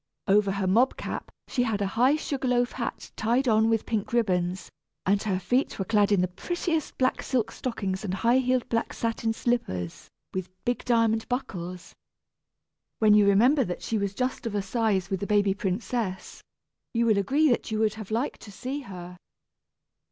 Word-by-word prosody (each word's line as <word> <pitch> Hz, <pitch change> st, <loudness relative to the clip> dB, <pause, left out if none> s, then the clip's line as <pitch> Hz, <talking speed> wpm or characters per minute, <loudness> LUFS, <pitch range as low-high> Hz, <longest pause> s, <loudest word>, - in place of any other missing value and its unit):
Over 200 Hz, 0 st, +4 dB
her 200 Hz, -1 st, -1 dB
mob 230 Hz, +8 st, +3 dB
cap -, -, -5 dB, 0.2 s
she 250 Hz, -, 0 dB
had 225 Hz, -4 st, 0 dB
a 200 Hz, -, 0 dB
high 255 Hz, +5 st, +4 dB
sugar 280 Hz, -4 st, -3 dB
loaf 245 Hz, -1 st, +2 dB
hat 240 Hz, -2 st, -5 dB
tied 240 Hz, +4 st, +1 dB
on 220 Hz, -1 st, +4 dB
with 225 Hz, -1 st, +1 dB
pink 220 Hz, -1 st, -2 dB
ribbons, 185 Hz, -5 st, 0 dB, 0.3 s
and 200 Hz, +1 st, +3 dB
her 200 Hz, -4 st, 0 dB
feet 245 Hz, +9 st, 0 dB
were 195 Hz, -, -2 dB
clad 210 Hz, -1 st, +3 dB
in 200 Hz, -3 st, +4 dB
the 180 Hz, -, +2 dB
prettiest 320 Hz, -, -3 dB
black 255 Hz, 0 st, +1 dB
silk 250 Hz, -5 st, 0 dB
stockings 195 Hz, -6 st, -3 dB
and 190 Hz, -3 st, -2 dB
high 235 Hz, +5 st, +3 dB
heeled 255 Hz, -1 st, +1 dB
black 230 Hz, 0 st, -1 dB
satin 230 Hz, -1 st, -1 dB
slippers, 155 Hz, -, -2 dB, 0.2 s
with 185 Hz, -1 st, -3 dB, 0.2 s
big 245 Hz, 0 st, -1 dB
diamond 225 Hz, -2 st, +2 dB
buckles. 180 Hz, -8 st, -4 dB, 1.0 s
When 215 Hz, -2 st, +5 dB
you 210 Hz, -1 st, +6 dB
remember 245 Hz, +8 st, +5 dB
that 180 Hz, -5 st, -5 dB
she 225 Hz, -, -1 dB
was 200 Hz, 0 st, -2 dB
just 255 Hz, -1 st, -2 dB
of 210 Hz, -, -4 dB
a 200 Hz, -, 0 dB
size 195 Hz, -3 st, 0 dB
with 190 Hz, -, 0 dB
the 200 Hz, -, -3 dB
baby 205 Hz, -2 st, +3 dB
princess, 200 Hz, 0 st, -3 dB, 0.5 s
you 235 Hz, 0 st, +3 dB
will 215 Hz, -3 st, +4 dB
agree 285 Hz, +10 st, +3 dB
that 240 Hz, -, 0 dB
you 220 Hz, -, -1 dB
would 215 Hz, -1 st, +2 dB
have 215 Hz, -3 st, -8 dB
liked 235 Hz, +6 st, -2 dB
to 205 Hz, -, -11 dB
see 260 Hz, +7 st, -4 dB
her. 180 Hz, -7 st, -9 dB
220 Hz, 185 wpm, -27 LUFS, 195-245 Hz, 1.0 s, you